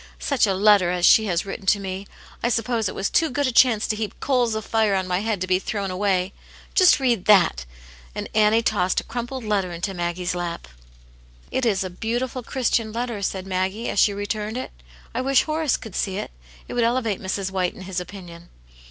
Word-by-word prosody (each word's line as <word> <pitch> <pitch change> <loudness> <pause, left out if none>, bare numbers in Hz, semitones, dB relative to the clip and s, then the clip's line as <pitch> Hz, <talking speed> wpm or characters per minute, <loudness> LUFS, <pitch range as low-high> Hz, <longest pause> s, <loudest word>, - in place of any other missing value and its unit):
Such 275 -6 +1
a 195 - +1
letter 200 -2 +5
as 180 0 +1
she 220 - +6
has 175 -1 0
written 195 0 -7
to 200 - +4
me! 190 0 -5 0.3
I 235 - +1
suppose 230 -2 0
it - - -8
was 195 - -1
too 325 - +2
good 285 +3 0
a 255 - +1
chance 230 -3 +4
to 215 - -1
heap 215 -1 -5
coals 245 -5 +1
of 220 -1 -4
fire 220 -3 +2
on 190 -1 0
my 180 0 0
head 215 -1 -1
to - - 0
be 185 0 +2
thrown 200 -1 -3
away. 185 0 0 0.4
Just 365 -5 +6
read 240 -7 +1
that 180 - +4 0.2
!" - - -22
And - - -4
Annie 215 +1 +4
tossed 185 -4 +1
a - - -7
crumpled 245 +1 -5
letter 200 -4 0
into 180 +3 -4
Maggie's 175 0 -2
lap. 175 - -4 0.4
" - - -28
It 260 -2 0
is 195 -3 +1
a 185 - -5
beautiful, 240 +6 -3
Christian 230 -2 -1
letter," 235 -2 -3
said 190 -1 -3
Maggie, 190 +4 -2
as - - 0
she 210 - +5
returned 210 +2 -3
it. 255 - -5 0.4
"I 245 - -1
wish 270 0 +3
Horace 310 -3 0
could 220 -5 -10
see 190 -1 -1
it. - - -5 0.4
It - - -7
would 240 - +1
elevate 230 -4 0
Mrs. 190 0 -3
White 185 -2 -1
in - - -11
his 185 -1 -3
opinion." 175 -2 -10
205 Hz, 220 wpm, -23 LUFS, 185-230 Hz, 0.4 s, she